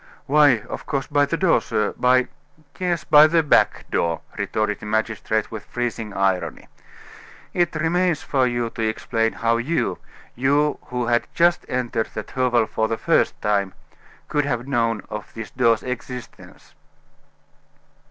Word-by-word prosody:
"Why, 145 -5 +4
of - - -8
course, 135 -3 -1
by 145 -1 +2
the 165 - -1
door, 170 -10 +3
sir 105 -1 -1
by 125 0 +3 0.2
" 150 -1 -28
"Yes, 175 -5 -1
by 150 +2 +7
the 165 +1 +2
back 150 - +3
door," 85 -2 0
retorted 110 -1 -1
the - - -8
magistrate, 110 0 -1
with 110 -2 -6
freezing 115 -3 -4
irony. 95 -2 -1 0.9
"It 175 -2 +1
remains 170 +1 +1
for 130 -3 +1
you 120 -1 -2
to - - -6
explain 115 +1 0
how 115 0 +1
you 150 +8 -1 0.3
you 145 +4 +1
who 125 -1 -3
had 120 0 +1
just 170 +1 +3
entered 120 -3 -1
that 105 - -6
hovel 125 -3 +2
for 110 0 -1
the 115 - -2
first - - +1
time 100 -2 0 0.5
could 145 -1 0
have 120 -3 -2
known 115 -6 0
of 105 -2 -6
this 110 -4 -7
door's 115 -3 +2
existence." 125 0 -8
120 Hz, 150 wpm, -22 LUFS, 110-145 Hz, 0.9 s, by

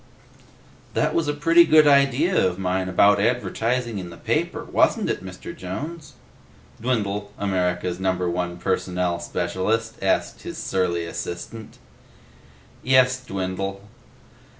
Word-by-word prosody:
"That - - +1
was 165 -2 0
a 145 - +1
pretty 165 +3 +6
good 155 -2 +6
idea 140 +5 +4
of 90 -1 0
mine, 95 0 -1
about 100 +2 +5
advertising 120 0 0
in 90 -2 -7
the 85 - -11
paper, - - -1
wasn't - - +2
it, - - -4
Mr. - - -8
Jones?" 150 - -7 0.7
Dwindle, 105 -4 -1
America's 90 -2 -1
Number 95 -1 0
One 85 0 -2
Personnel 90 -1 -1
Specialist, 110 +6 -2
asked 95 - 0
his - - -7
surly 85 -3 -1
assistant. 85 +6 -7 1.0
"Yes, 130 0 +3
Dwindle." 95 -2 -4
100 Hz, 120 wpm, -23 LUFS, 90-125 Hz, 1.0 s, pretty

